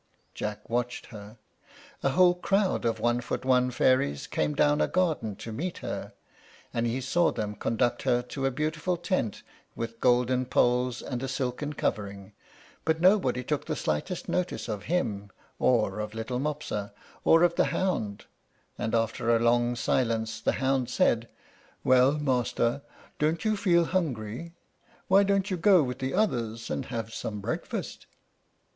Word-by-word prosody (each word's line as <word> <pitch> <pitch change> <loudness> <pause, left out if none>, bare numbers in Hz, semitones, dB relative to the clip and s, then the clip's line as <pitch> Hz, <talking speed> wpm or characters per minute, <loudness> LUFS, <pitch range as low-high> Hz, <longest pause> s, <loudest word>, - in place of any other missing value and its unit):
Jack 105 -1 -5
watched 120 +1 -2
her. 105 0 -10 0.6
A 140 - +2
whole 180 +4 +5
crowd 195 0 0
of 115 -1 0
one 120 +2 +1
foot 125 - -4
one 125 -1 +3
fairies 125 - +2
came 75 -1 -1
down 145 0 +3
a - - +3
garden 155 - 0
to 110 +2 -8
meet 165 +11 -4
her, - - -5 0.6
and 115 0 0
he 120 +3 -1
saw 165 +6 +2
them 105 -1 -3
conduct 120 +3 0
her 125 -2 +1
to 135 +2 -2
a - - +3
beautiful 155 +6 -1
tent, 170 - -2 0.3
with 115 0 -5
golden 125 0 +2
poles 125 0 +2
and 125 -2 -4
a 135 - -2
silken 130 +3 -3
covering; 100 -6 -3 0.5
but 160 0 +1
nobody 170 -10 +3
took - - -2
the - - -1
slightest 80 - -2
notice 180 -6 -2
of 105 -3 -4
him, 105 - -1 0.3
or 105 -5 +2
of 105 0 -4
little 115 +3 -3
Mopsa, 140 -8 -3 0.3
or 165 +1 +6
of 175 -1 +4
the - - +2
hound, 110 - -1 0.5
and 110 - -1
after 115 +1 +1
a - - +3
long 120 +1 +2
silence 115 -2 0
the - - +1
hound 130 -2 0
said, 115 -2 +2 0.5
"Well, 130 +2 +5
master, 130 -3 0 0.4
don't 160 +5 0
you 215 0 +2
feel 175 -4 +3
hungry? 160 - -3 0.5
Why 195 +1 +6
don't 200 0 +1
you 185 - 0
go 180 -1 +5
with 125 -1 -4
the 130 0 -2
others 115 - -1
and 135 - -2
have 115 -3 -5
some 105 -2 -4
breakfast?" 100 - -4
125 Hz, 160 wpm, -28 LUFS, 115-160 Hz, 0.6 s, or